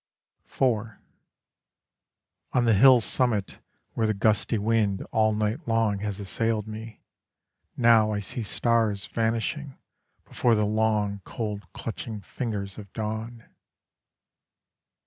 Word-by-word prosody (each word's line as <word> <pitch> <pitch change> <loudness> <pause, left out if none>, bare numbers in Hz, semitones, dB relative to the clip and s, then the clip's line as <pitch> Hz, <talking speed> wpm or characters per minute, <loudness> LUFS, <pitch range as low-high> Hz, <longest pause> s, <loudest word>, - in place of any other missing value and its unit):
IV - - -18 1.9
On 125 -2 +3
the 115 - +4
hill 125 +4 +7
summit 110 -2 0 0.3
Where 110 - 0
the 110 - 0
gusty 110 +2 +1
wind 105 -2 +1
all 110 -1 +3
night 110 +8 -2
long 115 -3 +1
has 105 -1 -4
assailed 110 +2 -1
me, 110 +1 -9 0.7
Now 115 -3 +5
I 105 - -1
see 105 +4 -4
stars 110 -2 +1
vanishing 115 +5 -2 0.5
Before 120 -2 +2
the 105 -1 +2
long 105 -1 0
cold 105 -2 -5
clutching 110 -1 -6
fingers 100 -4 -5
of 100 -3 -11
dawn. 110 +1 -5
110 Hz, 110 wpm, -26 LUFS, 105-115 Hz, 1.9 s, hill